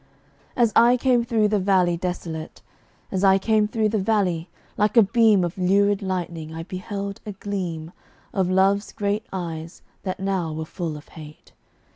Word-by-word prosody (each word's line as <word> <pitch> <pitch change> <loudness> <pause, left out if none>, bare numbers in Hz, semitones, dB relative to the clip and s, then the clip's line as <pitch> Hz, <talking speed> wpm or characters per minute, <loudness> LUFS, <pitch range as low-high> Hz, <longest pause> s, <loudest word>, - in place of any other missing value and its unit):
As 235 -4 +3
I 240 +2 +6
came 250 -2 +2
through 225 -3 +1
the 210 -1 +2
valley 185 -2 +3
desolate, 170 -2 -5 0.5
As 190 0 -1
I 195 -1 +6
came 215 +1 +2
through 215 0 0
the 215 0 0
valley, 190 -5 0 0.3
like 210 +3 +1
a 230 - +9
beam 220 -2 +4
Of 175 +2 -3
lurid 200 +2 +3
lightning 170 -4 -4
I 165 - -5
beheld 200 +2 -5
a 210 - -6
gleam 180 -5 -4 0.4
Of 190 -2 +1
Love's 195 +2 +2
great 210 +3 -2
eyes 165 -2 -6 0.2
that 185 -1 -4
now 190 -4 -1
were 160 0 -4
full 160 -2 -5
of 150 - -14
hate. 155 -2 -13
195 Hz, 165 wpm, -23 LUFS, 175-210 Hz, 0.5 s, a